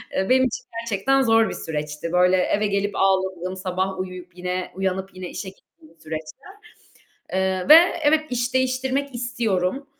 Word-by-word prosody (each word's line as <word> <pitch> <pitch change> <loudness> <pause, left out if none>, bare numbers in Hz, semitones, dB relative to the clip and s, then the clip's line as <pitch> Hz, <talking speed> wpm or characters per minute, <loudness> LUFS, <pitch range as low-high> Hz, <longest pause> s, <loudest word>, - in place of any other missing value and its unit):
eee, 190 - 0
benim 260 0 +5
için 235 - -6 0.2
gerçekten 230 +5 +1
zor 225 -3 +4
bir - - -4
süreçti. 150 +1 -5
Böyle 180 +1 +4
eve 205 +3 +1
gelip 200 0 -1
ağladığım, 190 -1 0
sabah 190 +1 -3
uyuyup, 185 -1 -7
yine 180 0 -3
uyanıp 190 0 -3
yine 185 -1 -7
işe 190 - -6
gittiğim 165 -3 -22
bir - - -36
süreçti. 155 0 -7 1.0
Eee, 190 -1 -1
ve 305 - +11 0.3
evet, 305 +1 +4
iş 245 0 -2
değiştirmek 260 +1 0
istiyorum 240 -1 -1
190 Hz, 155 wpm, -23 LUFS, 180-240 Hz, 1.0 s, ve